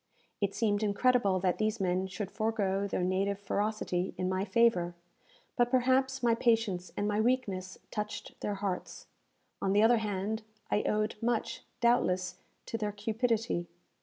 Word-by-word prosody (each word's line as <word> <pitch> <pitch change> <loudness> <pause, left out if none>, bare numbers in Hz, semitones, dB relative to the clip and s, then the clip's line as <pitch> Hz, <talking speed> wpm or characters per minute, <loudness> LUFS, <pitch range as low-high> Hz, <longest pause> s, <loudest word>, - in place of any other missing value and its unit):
It 200 -1 0
seemed 205 -2 +1
incredible 210 -2 +3
that 185 +2 +1
these 215 +1 0
men 185 0 0
should 190 +2 -5
forego 200 -3 0
their 185 - -1
native 190 +2 +1
ferocity 200 -3 -1
in 185 - -1
my 185 +1 0
favour; 190 -5 +3 0.6
but 240 0 +3
perhaps 260 +1 +2
my 235 -1 +4
patience 225 -6 +1
and 205 - 0
my 210 +1 +1
weakness 205 -7 0
touched 210 0 -5
their 205 - -1
hearts. 195 -2 -4 0.6
On 195 - +1
the 205 +1 +5
other 235 +1 +6
hand, 210 0 -2 0.3
I 210 - +3
owed 215 0 0
much, 235 -1 -1 0.2
doubtless, 185 -7 +2 0.3
to 225 - -4
their 210 -1 -1
cupidity. 220 -2 -1
210 Hz, 150 wpm, -31 LUFS, 190-230 Hz, 0.6 s, other